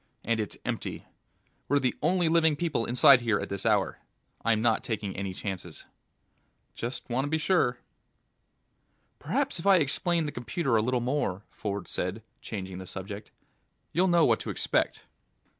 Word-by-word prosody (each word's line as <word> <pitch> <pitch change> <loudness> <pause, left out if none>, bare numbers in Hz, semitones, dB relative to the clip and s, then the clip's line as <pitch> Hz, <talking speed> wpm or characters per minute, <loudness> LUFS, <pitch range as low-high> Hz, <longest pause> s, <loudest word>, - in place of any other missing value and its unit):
And 115 0 0
it's 105 - -3
empty. - - -4 0.6
We're 145 - +3
the 130 -3 +1
only 175 +2 +2
living 160 -1 +4
people 145 -7 -1
inside 125 +2 +7
here 110 -3 +1
at - - -5
this 100 +3 -2
hour. 105 -3 +2 0.4
I'm 115 -1 +3
not 115 0 +2
taking 105 -4 -3
any 100 0 -3
chances." 95 -1 -6 0.9
"Just 120 +3 -5
want 130 +2 0
to - - -3
be 160 - +1
sure." 155 -7 +2 1.4
"Perhaps - - -1
if 165 - -3
I 195 - +8
explain 165 +1 +1
the 145 - -3
computer 120 +2 -1
a 110 - +4
little 125 +2 0
more," 120 -7 -1
Ford 100 -1 -4
said, 95 +5 -3 0.2
changing 95 -3 -6
the 95 - -8
subject, 100 +3 -7 0.6
"you'll 180 +3 +3
know 175 -2 +5
what - - +3
to - - -6
expect." - - 0
120 Hz, 160 wpm, -28 LUFS, 105-155 Hz, 1.4 s, I